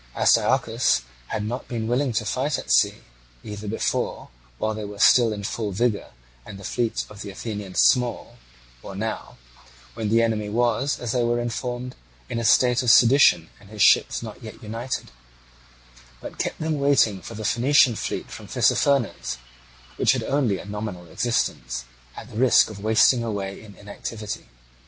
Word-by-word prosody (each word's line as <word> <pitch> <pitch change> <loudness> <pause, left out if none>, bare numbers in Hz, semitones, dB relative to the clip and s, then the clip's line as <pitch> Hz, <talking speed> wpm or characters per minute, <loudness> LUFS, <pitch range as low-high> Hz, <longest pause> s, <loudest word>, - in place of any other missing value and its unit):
Astyochus - - +2 0.2
had 105 - -3
not 120 +4 -5
been 115 -2 -3
willing 125 +3 +1
to 110 -1 -1
fight 130 +5 -1
at - - -5
sea—either - - -2
before, 110 - -2 0.3
while 110 - -1
they 110 0 -6
were 105 0 -8
still 115 +2 +5
in 105 -1 -5
full 105 +1 -3
vigour 105 +1 -1 0.3
and 100 - -10
the 100 - -12
fleet 115 +3 -2
of 105 0 -12
the 100 - -6
Athenians 100 -2 -3
small, 125 - +1 0.4
or 100 - -9
now, 110 +3 -5 0.6
when 110 -2 -3
the 115 +2 +4
enemy 110 -2 -1
was, 120 +5 0
as 120 -2 -3
they 125 - +1
were 120 0 +1
informed, 120 +1 -4 0.3
in 115 - -2
a - - -3
state 125 +2 +4
of 125 - 0
sedition 115 - +5
and 100 - -18
his 105 -1 0
ships - - +4
not - - -9
yet - - -11
united—but - - -10
kept - - -2
them 155 -2 -1
waiting 135 -9 +3
for 115 - -9
the 110 0 -6
Phoenician 125 +1 +4
fleet - - -4
from - - -9
Tissaphernes, 120 - +1 0.6
which - - +3
had - - -2
only 130 -8 0
a - - -10
nominal 105 -3 -6
existence, 115 - -2 0.3
at - - -8
the - - -8
risk 125 -3 +5
of 105 - -9
wasting 110 +3 +4
away 100 -3 -4
in 105 -2 -14
inactivity. 105 +1 -7
110 Hz, 165 wpm, -24 LUFS, 100-120 Hz, 0.6 s, still